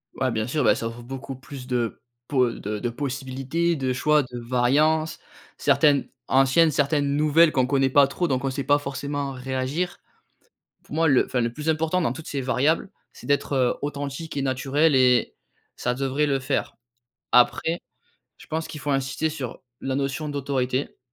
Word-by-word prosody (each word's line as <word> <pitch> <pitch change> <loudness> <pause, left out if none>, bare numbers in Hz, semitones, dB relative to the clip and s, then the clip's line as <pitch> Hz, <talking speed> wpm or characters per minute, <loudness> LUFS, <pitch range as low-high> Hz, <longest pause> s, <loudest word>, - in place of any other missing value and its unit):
Ouais, 130 - 0
bien 110 -1 -1
sûr, 140 +4 -1
bah - - +5
ça 115 - -3
offre 115 +1 -8
beaucoup 135 +2 -7
plus 130 -1 -10
de 120 -3 -2 0.3
po 130 -4 +2
de 105 -1 -5
de 120 - -2
possibilités, 135 +5 -2
de 130 -2 -1
choix, 150 +3 +3
de 125 -1 -8
variances. 140 +7 +1 0.4
Certaines 145 -2 +3 0.2
anciennes, 135 +5 +4
certaines 145 0 +1
nouvelles 155 +2 +4
qu'on 130 -2 +3
connaît 135 0 +2
pas 140 +1 +5
trop 175 +5 -1
donc 130 -3 -1
on 135 - 0
sait 135 0 -4
pas 145 +2 +4
forcément 140 0 -4
réagir. 130 +7 -3 0.9
Pour - - -10
moi 165 +1 +3
le, 135 -3 +4
enfin, 125 - -1
le 115 0 0
plus 150 +5 -5
important 160 +3 +1
dans 170 - +1
toutes 160 - -9
ces 140 - -2
variables, 140 +8 +1 0.2
c'est - - -13
d'être, 140 0 0
heu, 130 -2 +2
authentique 145 +2 -4
et 140 - 0
naturel 135 +3 +2
et 125 -2 +4 0.4
ça 125 - -1
devrait 135 +3 0
le 140 -2 +1
faire. 135 +1 -2 0.6
Après, 145 +7 +3 0.6
je - - -16
pense 160 +1 -3
qu'il 150 - -8
faut 145 - -3
insister 135 +3 0
sur 135 -6 -6 0.2
la 135 - -2
notion 140 +2 -2
d'autorité. 135 -2 -2
135 Hz, 180 wpm, -24 LUFS, 130-150 Hz, 0.9 s, bah